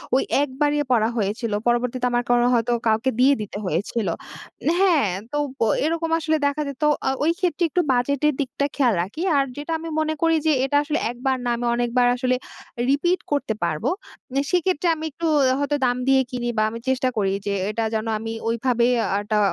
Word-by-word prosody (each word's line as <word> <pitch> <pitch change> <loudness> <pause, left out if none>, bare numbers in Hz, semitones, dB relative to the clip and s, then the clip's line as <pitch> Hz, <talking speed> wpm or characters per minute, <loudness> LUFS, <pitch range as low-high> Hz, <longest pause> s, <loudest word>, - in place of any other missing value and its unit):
ওই 265 - +3 0.2
১ 290 - 0
বারই 295 0 +3
পড়া 225 -2 +3
হয়েছিল। 215 +2 -1 0.2
পরবর্তীতে 245 +1 +1
আমার 240 0 +1
কোন 245 0 +4
হয়তো 235 0 +1 0.2
কাউকে 225 +4 +2
দিয়ে 265 +3 +6
দিতে 210 -1 -6
হয়েছিল 195 +6 -1 0.7
হ্যাঁ। 345 - +4 0.2
তো 295 - -2 0.5
এরকম 330 +1 -1
আসলে 315 -1 +1
দেখা 285 +2 -1
যেত 280 +2 -6 0.2
আ - - +4 0.2
ওই 325 - +4
ক্ষেত্রে 350 -3 0
একটু 355 - +1
বাজেটের 280 +4 +1
দিকটা 275 +1 -2
খেয়াল 255 -5 +3
রাখি। 205 - -7 0.2
আর 275 - +4
যেটা 295 +3 -5
আমি 330 +1 -6
মনে 310 0 0
করি 330 -1 +3
যে, 315 - +4
এটা 285 +2 +1
আসলে 300 +1 -1
একবার 260 +2 -1
না, - - 0
আমি 240 +1 -3
অনেকবার 245 +1 +2
আসলে 255 0 +1 0.5
রিপিট 345 +7 +2
করতে 280 -6 0
পারব। 155 -3 -1 0.7
সেক্ষেত্রে 360 -1 +1
আমি 315 0 -6
একটু 335 +4 -5 0.3
হয়তো 285 +1 0
দাম 245 0 +1
দিয়ে 270 0 +5
কিনি 245 -1 -3
বা 215 - +3
আমি 230 +1 -7
চেষ্টা 260 0 +1
করি 195 -2 +1
যে, 200 - -1 0.2
এটা 225 +2 -2
যেন 220 0 -1
আমি 225 +1 -5 0.2
ওইভাবে 235 +1 +1 0.4
একটা 210 +1 -1
255 Hz, 185 wpm, -23 LUFS, 235-295 Hz, 0.7 s, দিয়ে